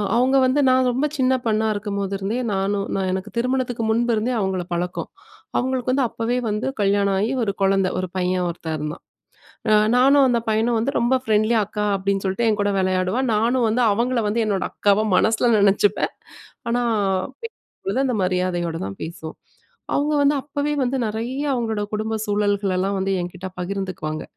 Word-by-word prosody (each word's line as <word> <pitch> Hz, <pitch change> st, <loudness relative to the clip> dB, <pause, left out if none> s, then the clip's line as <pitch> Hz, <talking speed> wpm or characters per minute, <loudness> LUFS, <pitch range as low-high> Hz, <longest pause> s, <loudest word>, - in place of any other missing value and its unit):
அவங்க 255 Hz, +3 st, +3 dB
வந்து 255 Hz, +3 st, +2 dB
நான் 255 Hz, 0 st, +3 dB
ரொம்ப 260 Hz, +4 st, 0 dB
சின்ன 260 Hz, 0 st, +3 dB
பொண்ணா 220 Hz, 0 st, +1 dB
இருக்கும்போதுருந்தே, 200 Hz, +1 st, -3 dB
நானும் 195 Hz, +1 st, -1 dB
நான் 190 Hz, -1 st, -1 dB
எனக்கு 190 Hz, +3 st, -4 dB
திருமணத்துக்கு 250 Hz, -1 st, -1 dB
முன்பிருந்தே 235 Hz, +1 st, +1 dB
அவங்கள 190 Hz, -2 st, -1 dB
பழக்கம். 175 Hz, +1 st, -3 dB, 0.5 s
அவங்களுக்கு 255 Hz, 0 st, 0 dB
வந்து 265 Hz, 0 st, +2 dB
அப்பவே 235 Hz, +2 st, -2 dB
வந்து 210 Hz, +4 st, -2 dB
கல்யாணம் 200 Hz, 0 st, +2 dB
ஆயி, 220 Hz, +5 st, 0 dB
ஒரு 205 Hz, -, 0 dB
குழந்தை, 195 Hz, -1 st, +3 dB
ஒரு 185 Hz, -, -2 dB
பையன் 180 Hz, 0 st, 0 dB
ஒருத்தன் 165 Hz, -2 st, -4 dB
இருந்தான். 150 Hz, +3 st, -5 dB, 0.7 s
அ 215 Hz, -, +6 dB, 0.2 s
நானும், 275 Hz, +2 st, +5 dB
அந்த 235 Hz, -1 st, +2 dB
பையனும் 225 Hz, +2 st, +1 dB
வந்து 260 Hz, +5 st, -1 dB
ரொம்ப 240 Hz, +2 st, +2 dB
ஃப்ரெண்ட்லியா, 215 Hz, +1 st, +2 dB
"அக்கா" 210 Hz, 0 st, -3 dB
அப்டீன்னு 195 Hz, 0 st, -1 dB
சொல்லிட்டு 210 Hz, +5 st, 0 dB
என் 215 Hz, -, 0 dB
கூட 205 Hz, 0 st, +1 dB
விளையாடுவான். 185 Hz, +7 st, 0 dB
நானும் 235 Hz, +3 st, +2 dB
வந்து 235 Hz, +3 st, +1 dB
அவங்கள 240 Hz, +4 st, 0 dB
வந்து 225 Hz, +2 st, +1 dB
என்னோட 200 Hz, -3 st, 0 dB
அக்காவா 205 Hz, +1 st, +2 dB
மனசுல 225 Hz, +4 st, +3 dB
நினைச்சிப்பேன். 200 Hz, 0 st, +2 dB, 0.6 s
ஆனா, 245 Hz, +1 st, +1 dB, 0.6 s
பேசும்போது 390 Hz, -, -5 dB
அந்த 250 Hz, -, 0 dB
மரியாதையோட 180 Hz, -2 st, -1 dB
தான் 100 Hz, 0 st, -8 dB
பேசுவோம். 160 Hz, -1 st, -7 dB, 0.6 s
அவங்க 295 Hz, +1 st, +1 dB
வந்து 285 Hz, +1 st, +4 dB
அப்பவே 290 Hz, +1 st, -2 dB
வந்து 255 Hz, +1 st, 0 dB
நெறைய 230 Hz, +5 st, -3 dB
அவங்களோட 225 Hz, -4 st, -1 dB
குடும்ப 220 Hz, +1 st, -2 dB
சூழல்களெல்லாம் 200 Hz, -2 st, 0 dB
வந்து 195 Hz, +1 st, -1 dB
என்கிட்டே 180 Hz, +1 st, -7 dB
பகிர்ந்துக்குவாங்க. 180 Hz, -5 st, -4 dB
210 Hz, 160 wpm, -22 LUFS, 190-245 Hz, 0.7 s, அ